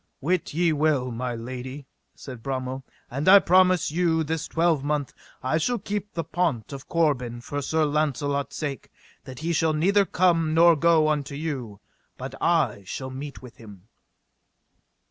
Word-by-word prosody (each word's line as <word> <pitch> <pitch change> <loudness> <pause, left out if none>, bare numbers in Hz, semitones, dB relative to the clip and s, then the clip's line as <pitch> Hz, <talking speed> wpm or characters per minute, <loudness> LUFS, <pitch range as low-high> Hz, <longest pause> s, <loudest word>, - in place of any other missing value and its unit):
Wit 170 +4 -1
ye 170 -1 +2
well, 145 -4 +1
my 120 +1 -3
lady, 130 +4 -7 0.3
said 125 -4 -10
Bromel, 130 0 -4 0.3
and 140 +7 0
I 200 - +10
promise 185 -3 +4
you 165 -1 +1
this 160 +1 -3
twelvemonth 150 -4 0 0.3
I 130 +5 +1
shall 245 +9 0
keep 205 -1 -5
the 165 - -2
pont 150 - -2
of 135 -1 -9
Corbin 130 -8 0
for 145 +4 -5
Sir 160 +3 +1
Launcelot's 145 -1 -1
sake, 145 -3 -5 0.4
that 130 - -9
he 170 +1 -1
shall 160 0 +2
neither 195 +6 +3
come 165 -4 +2
nor 170 0 +6
go 160 0 +4
unto 145 -2 -1
you, 135 -9 -5 0.4
but - - -7
I 100 - +2
shall 130 +7 -6
meet 140 +1 -8
with 125 - -12
him. 105 -2 -14
150 Hz, 155 wpm, -25 LUFS, 130-165 Hz, 0.4 s, I